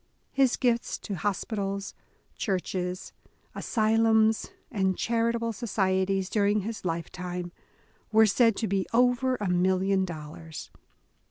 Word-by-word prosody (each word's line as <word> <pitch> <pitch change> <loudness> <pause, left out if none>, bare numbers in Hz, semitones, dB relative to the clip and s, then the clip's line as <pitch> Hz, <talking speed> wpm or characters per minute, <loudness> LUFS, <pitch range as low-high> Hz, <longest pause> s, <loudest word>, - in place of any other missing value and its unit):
His 270 -3 +3
gifts 240 -2 +1
to 205 - -6
hospitals, 200 +1 -2 0.4
churches, 185 -2 -3 0.4
asylums, 220 +1 +2 0.2
and 190 -5 +1
charitable 230 0 0
societies 190 -3 0
during 205 +1 +2
his 220 +3 -5
lifetime, 175 +1 -4 0.6
were 220 0 +6
said 225 +1 +4
to 220 - -1
be 195 0 0
over 250 +2 +3
a 210 -5 -3
million 190 +2 +2
dollars. 160 -2 -7
200 Hz, 105 wpm, -28 LUFS, 185-225 Hz, 0.6 s, were